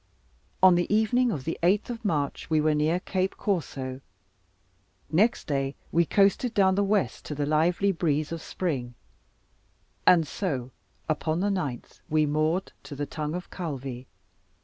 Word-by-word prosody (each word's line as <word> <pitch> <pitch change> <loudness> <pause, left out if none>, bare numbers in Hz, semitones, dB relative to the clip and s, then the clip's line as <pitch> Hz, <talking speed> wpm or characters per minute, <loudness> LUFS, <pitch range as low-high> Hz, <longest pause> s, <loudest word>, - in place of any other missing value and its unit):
On 185 -1 +9
the 175 +2 0
evening 230 +4 +3
of 145 -10 -4
the 165 - -3
8th 195 +7 +2
of 235 -1 -7
March, 150 -9 -1
we 155 -1 +3
were 155 0 +3
near 155 +4 +1
Cape 185 0 -1
Corso; 135 -9 -2 1.1
next 210 +9 +2
day 135 -1 -1 0.2
we 170 -1 +3
coasted 205 +4 +2
down 190 -2 +4
the 200 +2 +2
west 200 0 0
to 150 - -5
the 145 0 -1
lively 170 +6 +2
breeze 155 -4 0
of 165 -1 -4
spring, 130 -12 -3 1.1
and 170 -3 +6
so 135 -7 -3 0.4
upon 155 +1 0
the 200 +2 +1
9th 150 -11 -4
we 155 0 +3
moored 155 +5 0
to 145 0 -9
the 145 +1 -2
tongue 150 +2 -4
of 180 - -7
Calvi. 135 -7 -5
165 Hz, 155 wpm, -27 LUFS, 145-190 Hz, 1.1 s, On